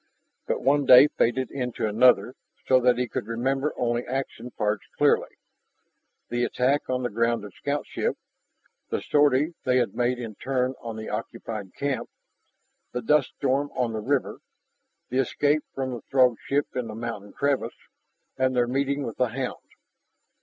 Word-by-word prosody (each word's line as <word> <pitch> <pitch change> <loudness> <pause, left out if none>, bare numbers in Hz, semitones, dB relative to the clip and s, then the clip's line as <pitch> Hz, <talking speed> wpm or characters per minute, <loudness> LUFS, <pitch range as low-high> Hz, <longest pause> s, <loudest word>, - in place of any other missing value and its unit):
But - - -1
one 140 0 +3
day 130 +4 +9
faded 130 +1 0
into 125 -4 -3
another 115 +1 +4 0.3
so 130 - +5
that 125 -1 +3
he 125 0 0
could 105 - -4
remember 135 +5 0
only 120 0 0
action 130 -2 -4
parts 105 -3 -1
clearly - - +2 0.9
the 120 0 0
attack 130 +4 +1
on 130 0 0
the 120 - 0
grounded 115 -2 0
scoutship, 145 +1 -2 0.7
the - - -1
sortie 145 +2 +3
they 130 0 +2
had 120 -6 +1
made 125 +1 0
in 115 -3 -6
turn 130 +3 -1
on 115 -1 -6
the 110 0 -6
occupied 105 -4 -5
camp, 135 -4 -2 0.8
the 125 -1 -3
dust 150 +2 +2
storm 140 +1 +1
on 120 -3 0
the 110 - -2
river, 135 +4 -1 0.7
the 130 - 0
escape 145 +3 +2
from 130 -1 -2
the 120 -3 -5
Throg 125 -3 +4
ship 145 +1 0
in 125 -2 -2
the 110 - -7
mountain 110 -3 -6
crevice, 140 -1 -1 0.6
and 130 0 +1
their 120 -1 +3
meeting 140 +2 0
with 115 - -5
the 125 - +2
hound. 125 +2 -5
125 Hz, 160 wpm, -26 LUFS, 115-135 Hz, 0.9 s, day